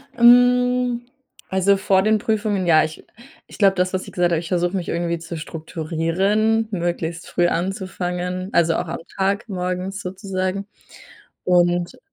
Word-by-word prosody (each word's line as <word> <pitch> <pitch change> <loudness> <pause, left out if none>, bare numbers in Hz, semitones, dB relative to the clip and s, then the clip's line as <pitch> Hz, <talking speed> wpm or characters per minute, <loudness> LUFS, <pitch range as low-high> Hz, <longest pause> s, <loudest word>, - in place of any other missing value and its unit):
Hm, 245 0 +4 0.5
also 190 +1 +3
vor 190 0 +2
den 215 +1 +3
Prüfungen, 210 -3 -1
ja. 155 -2 +6
Ich 155 0 -6 0.4
ich - - -13
glaube, 195 -2 +4
das, 185 0 0
was 185 - -2
ich - - -10
gesagt 175 -1 +1
habe 165 - +2
ich 165 - -7
versuche 175 +1 0
mich 180 -3 -3
irgendwie 170 0 -1
zu 165 0 -7
strukturieren, 170 +8 -1
möglichst 170 -3 -3
früh 175 -1 +1
anzufangen, 180 0 -3
also 165 -1 +3
auch - - -2
am 165 - -4 0.2
Tag 200 +4 0
morgens 185 +1 -3
sozusagen 190 +1 -3 0.8
und 175 -1 +2
185 Hz, 150 wpm, -21 LUFS, 175-200 Hz, 0.8 s, ja